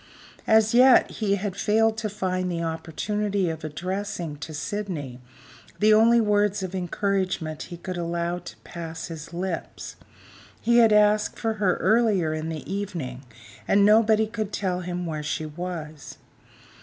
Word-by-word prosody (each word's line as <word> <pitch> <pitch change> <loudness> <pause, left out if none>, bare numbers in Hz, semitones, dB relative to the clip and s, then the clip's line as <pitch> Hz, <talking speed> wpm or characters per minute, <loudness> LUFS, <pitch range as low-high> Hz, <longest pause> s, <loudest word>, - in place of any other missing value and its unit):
As 220 0 +4
yet, 255 +1 +6
he 200 -3 0
had 200 -1 -4
failed 220 +2 +2
to 220 -1 -2
find 185 -3 -2
the 170 -1 -2
opportunity 190 +4 -2
of 160 -1 -8
addressing 175 0 -4
to 155 +2 -7
Sydney 150 -5 -4 0.6
the 215 +1 +5
only 230 +2 +6
words 205 -2 +2
of 185 0 -5
encouragement 185 -3 -2
he 175 - -7
could 185 +1 -6
allow 170 0 -2
to - - -11
pass 165 -1 -7
his 160 -1 -8
lips: 175 0 -5 0.6
he 235 0 +3
had 225 -2 +6
asked 210 0 +3
for 225 -1 -1
her 185 -3 +3
earlier 210 -8 +2
in 155 +1 -3
the 160 -2 -6
evening, 175 -11 -4 0.5
and 200 0 +4
nobody 220 +1 +5
could 215 -2 -4
tell 185 -3 -1
him 180 0 -4
where 155 -2 -3
she 150 +1 -3
was. 155 -2 -7
185 Hz, 150 wpm, -25 LUFS, 165-210 Hz, 0.6 s, yet